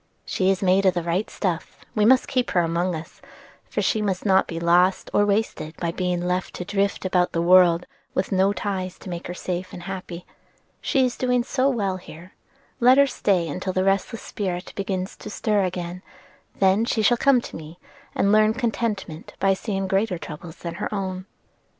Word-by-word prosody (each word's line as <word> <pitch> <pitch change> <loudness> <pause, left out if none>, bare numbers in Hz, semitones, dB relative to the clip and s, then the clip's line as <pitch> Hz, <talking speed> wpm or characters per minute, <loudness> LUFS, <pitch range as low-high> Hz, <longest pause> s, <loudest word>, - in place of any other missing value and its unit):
"She 185 0 0
is 195 0 +1
made 190 +1 +4
of 185 - +3
the 175 - -1
right 175 +5 -1
stuff, 175 -5 -3
and - - -24
we 210 - +3
must 260 +3 +5
keep 255 -2 0
her 175 - +2
among 170 +2 0
us; 160 +1 -9 0.5
for - - -1
she 220 - +1
must 195 -2 -2
not 190 -1 +4
be 165 - -4
lost 175 +2 +3
or 205 - +3
wasted 200 -6 -1
by 170 -1 -2
being 180 0 -1
left 180 +1 -2
to 180 - -5
drift 200 0 -1
about 180 -1 +1
the 165 - 0
world 180 -1 +5 0.3
with 185 - -1
no 190 +1 +3
ties 190 -3 -3
to 185 - -9
make 170 0 -5
her 175 - -5
safe 180 0 -4
and 175 - -8
happy. 180 -2 -7 0.6
She 265 -2 +2
is 245 - -2
doing 250 -1 +1
so 265 +2 +1
well 200 -7 -1
here, 175 0 -12 0.5
let 250 +1 +6
her 280 - +7
stay 180 - 0
till 185 0 -3
the 185 - +1
restless 195 +4 0
spirit 185 -3 -4
begins 190 -1 -3
to - - -8
stir 210 -1 +1
again; 180 0 -4 0.6
then 195 +3 +3
she 225 -1 0
shall 240 - +5
come 275 +1 +4
to - - -9
me 160 +1 -9 0.4
and 200 - +2
learn 215 +1 +4
contentment 220 -9 -3
by 195 0 +3
seeing 195 -1 -3
greater 195 0 +1
troubles 165 +1 -9
than 170 -1 -6
her - - -2
own." 190 -2 -4
190 Hz, 200 wpm, -24 LUFS, 180-210 Hz, 0.6 s, her